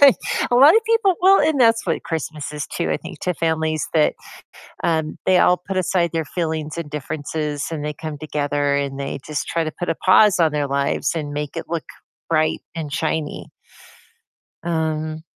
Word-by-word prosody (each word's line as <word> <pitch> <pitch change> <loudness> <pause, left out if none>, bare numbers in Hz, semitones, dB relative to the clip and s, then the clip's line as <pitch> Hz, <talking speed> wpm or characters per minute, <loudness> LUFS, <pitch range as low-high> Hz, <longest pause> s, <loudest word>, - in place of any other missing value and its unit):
I 275 -3 +9 0.4
A - - +3
lot 280 - +8
of 450 - +5
people 450 -4 +3
well, 385 +2 +6
and 305 -4 +2
that's 230 -1 +4
what - - -1
Christmas 155 -2 -4
is 150 - -4
too, 170 - -3
I - - +1
think, 170 -2 -10
to 180 -1 -1
families 160 -1 0
that, 155 -2 +3 0.7
um, 160 -2 0
they 185 - +5
all 180 0 +5
put 190 +1 -5
aside 175 -2 +1
their 165 -1 -1
feelings, 160 -1 -3
and 165 -3 -5
differences, 150 0 -3
and 155 -3 -4
they 150 0 -3
come 155 0 -6
together, 145 -1 -1
and 140 -1 -2
they 140 0 -4
just 150 -1 -3
try 165 - 0
to 155 - -3
put 175 - -2
a - - +1
pause 190 +3 +5
on 160 -2 +4
their 145 -1 -1
lives, 140 0 0
and 150 -3 -3
make 150 0 -4
it - - -4
look 170 -1 -3 0.4
bright 155 -1 +1
and 155 -3 -5
shiny. 155 0 -2 1.2
Um, 155 -1 -2
160 Hz, 190 wpm, -21 LUFS, 150-175 Hz, 1.2 s, I